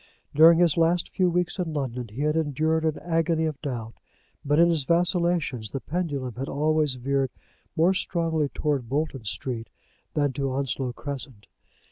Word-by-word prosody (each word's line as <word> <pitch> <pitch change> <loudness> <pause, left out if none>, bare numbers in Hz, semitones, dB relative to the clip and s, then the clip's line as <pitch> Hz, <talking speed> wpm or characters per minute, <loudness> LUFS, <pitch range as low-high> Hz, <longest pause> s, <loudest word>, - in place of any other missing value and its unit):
During 165 +3 +8
his 170 -2 +3
last 170 +1 +2
few 185 -1 +2
weeks 180 +2 -1
in 170 -3 -2
London 125 -4 -3
he 115 +7 -5
had 150 +1 +1
endured 160 +1 +1
an 155 -1 0
agony 165 -1 +1
of 155 -3 -4
doubt; 120 -6 -4 0.5
but 145 +1 +1
in 170 +1 +6
his 160 -4 +1
vacillations 170 - +1
the 135 - -4
pendulum 145 -6 -3
had 135 - -3
always 150 -1 +1
veered 135 +1 0 0.5
more 170 +4 +4
strongly 165 -5 0
towards 145 -5 -1
Bolton 140 -2 -2
Street 115 +2 -4 0.5
than 145 -3 +1
to 135 0 -2
Onslow 135 -1 -1
Crescent. 135 -6 -7
150 Hz, 160 wpm, -26 LUFS, 135-165 Hz, 0.5 s, During